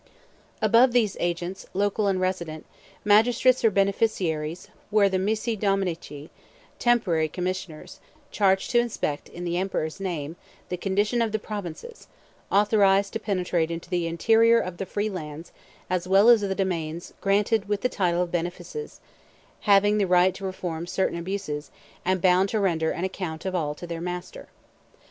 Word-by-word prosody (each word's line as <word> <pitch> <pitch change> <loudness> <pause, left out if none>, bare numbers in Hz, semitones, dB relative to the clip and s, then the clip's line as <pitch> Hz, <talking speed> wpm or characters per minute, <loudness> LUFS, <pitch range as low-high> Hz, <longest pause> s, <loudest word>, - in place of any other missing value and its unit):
Above 240 +2 +5
these 220 -5 +2
agents, 175 +2 -3
local 205 +1 +1
and 190 -2 +1
resident, 175 -4 -3 0.4
magistrates 235 +4 +4
or 225 - +6
beneficiaries, 190 -5 0 0.2
were 210 -1 +4
the 190 -1 0
missi 220 +4 -1
dominici, 185 -7 -2 0.5
temporary 195 -10 +2
commissioners, 180 -2 -5 0.3
charged 195 -2 +2
to 240 - +4
inspect, 225 -11 -2
in 175 - -8
the 175 0 -1
emperor's 180 -4 -2
name, 170 -4 -4 0.3
the 180 - -2
condition 205 +6 0
of 225 -2 0
the 220 - 0
provinces; 210 - -7 0.4
authorized 200 -1 +3
to 225 - -2
penetrate 180 -5 -1
into 170 +2 -6
the 175 -2 0
interior 225 +7 +4
of 180 -4 -4
the 195 - -5
free 205 +3 -1
lands 160 -4 -7 0.4
as 180 0 -2
well 195 +4 +6
as 235 -3 +7
of 200 - -2
the 190 - -1
domains 170 -4 -3
granted 205 +1 +1
with 205 -1 0
the - - +2
title 180 -6 0
of 175 - -6
benefices; 180 - -5 0.7
having 205 +1 +5
the 200 - +2
right 180 +1 +4
to 195 - -11
reform 175 -3 -4
certain 180 -1 -1
abuses, 170 -5 -4 0.3
and 185 -1 0
bound 185 +1 +4
to 220 - 0
render 165 -5 +1
an 170 - -3
account 180 -4 -4
of 190 - -2
all 150 -5 -1
to 175 - -9
their 170 -1 -5
master. 180 0 -6
190 Hz, 160 wpm, -25 LUFS, 175-205 Hz, 0.7 s, as